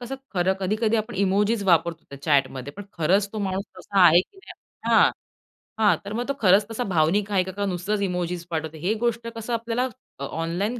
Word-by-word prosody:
कसं 245 +2 -5 0.2
खरं, 180 +1 +2
कधी-कधी 215 +4 +1
आपण 220 +1 -3
इमोजीस 205 +3 +1
वापरतो 170 -2 +2
त्या 140 0 -10
चॅट 140 -4 +3
मध्ये. 130 +2 -7
पण 205 - -6 0.2
खरंच 195 +5 +2
तो 215 - -4
माणूस 190 +1 -2
तसा 195 +1 0
आहे 170 +2 +7
की 385 - -12
नाही, - - -10 0.4
हां, - - +6 0.7
हां. 215 -2 +5
तर 205 - -5
मग 240 +3 -3
तो 280 - +2
खरंच 200 0 +5
तसा 245 +2 -2
भावनिक 190 +6 +2
आहे 185 -2 +3
का, 190 - -6
का 200 +2 -3
नुसतंच 195 +3 -2
इमोजीस 180 -2 -2
पाठवतो, 160 -1 -3
ही 180 +7 0
गोष्ट 230 0 -1
कसं 230 +1 -4
आपल्याला 230 +2 -1 0.3
अ, - - -5
ऑनलाईन 175 - -2
195 Hz, 205 wpm, -24 LUFS, 170-215 Hz, 0.7 s, आहे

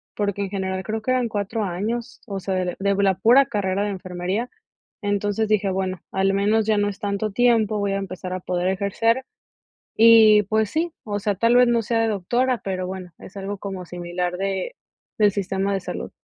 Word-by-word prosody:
porque 200 -1 -1
en 195 - -4
general 190 -1 -3
creo 220 +2 -3
que 255 - -1
eran 255 -2 +1
4 215 +1 -2
años, 215 +6 -4
o 200 -3 -4
sea, 190 +1 -3
de 180 -1 -1
de 200 0 +1
la 195 -1 +3
pura 240 +9 +5
carrera 200 -4 -1
de 205 - -1
enfermería. 185 +4 -3 0.5
Entonces 205 +1 -1
dije: 210 -2 +2
"bueno, 190 -1 -2
al 195 0 +2
menos 210 +2 +2
ya 215 -1 +2
no 205 0 +2
es 200 - -8
tanto 205 +1 -2
tiempo, 225 -1 +2
voy 200 -1 0
a 195 - 0
empezar 185 -1 -6
a 185 - -3
poder 180 0 -2
ejercer 225 +6 0 0.8
y 220 -2 +8
pues 215 +1 0
sí", 330 +2 -1
o 205 -2 -2
sea, 205 0 0
tal 230 +5 +3
vez, 250 - +6
no 235 -1 +2
sea 225 +1 0
de 225 - +2
doctora, 240 +5 0
pero 185 -1 -2
bueno, 185 -1 -7
es 190 - -13
algo 200 +1 -5
como 190 -2 -6
similar 175 +1 -3
de, 195 - -2 0.4
del 210 -1 +4
sistema 195 0 -1
de 195 - -1
salud. 180 - -6
200 Hz, 205 wpm, -23 LUFS, 190-220 Hz, 0.8 s, y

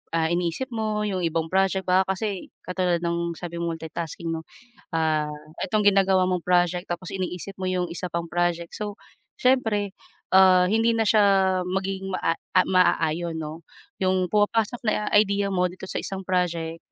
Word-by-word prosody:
ah, 160 -1 +2
iniisip 175 +9 -1
mo 215 -2 -1
yung 200 -3 -1
ibang 165 -2 -1
project 190 0 +2
baka 185 +1 +3
kasi 200 -2 -4 0.2
katulad 180 -2 0
ng 170 0 -1
sabi 170 0 -6
multi-tasking 165 0 -4
'no, 160 0 -5 0.4
ah, 155 -2 +1 0.3
itong 210 +2 0
ginagawa 190 -2 +4
mong 180 -1 -1
project 180 0 +1
tapos 175 +1 -4
iniisip 185 +1 -4
mo 185 -1 -3
'yong 180 -1 0
isa 170 +1 -5
pang 170 0 -3
project, 170 0 -1
so 210 -1 -5 0.4
siyempre, 225 -6 +1 0.4
ah, 185 -1 +7
hindi 225 +4 +2
na 225 -1 +1
siya 215 0 +5 0.4
magiging 190 +1 -2
maa 165 -2 +1 0.3
ma-aayon 170 -2 +2
'no. 160 +1 -6 0.4
Yung 185 -1 +1
pumapasok 215 +3 +1
na 210 0 +1
idea 200 -1 +3
mo 180 -1 +2
dito 185 +1 -9
sa - - -2
isang 195 0 -5
project, 170 -3 -1
185 Hz, 155 wpm, -25 LUFS, 170-195 Hz, 0.4 s, ah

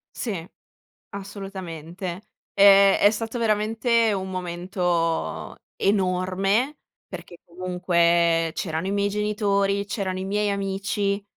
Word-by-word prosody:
Sì, 190 -9 -4 0.6
assolutamente. 190 -2 -7 0.2
Ehm, 200 -1 +7
è 205 - +5
stato 225 +2 -4
veramente 225 +1 +2
un 190 -1 -3
momento 175 -2 -2 0.2
enorme, 195 +7 +1 0.3
perché 175 - -10
comunque 170 -2 +1
c'erano 160 +1 -3
i - - -1
miei 200 0 +1
genitori, 200 -1 0
c'erano 190 -2 -3
i - - -3
miei 205 +1 0
amici, 200 0 -1
195 Hz, 100 wpm, -24 LUFS, 180-205 Hz, 0.6 s, Ehm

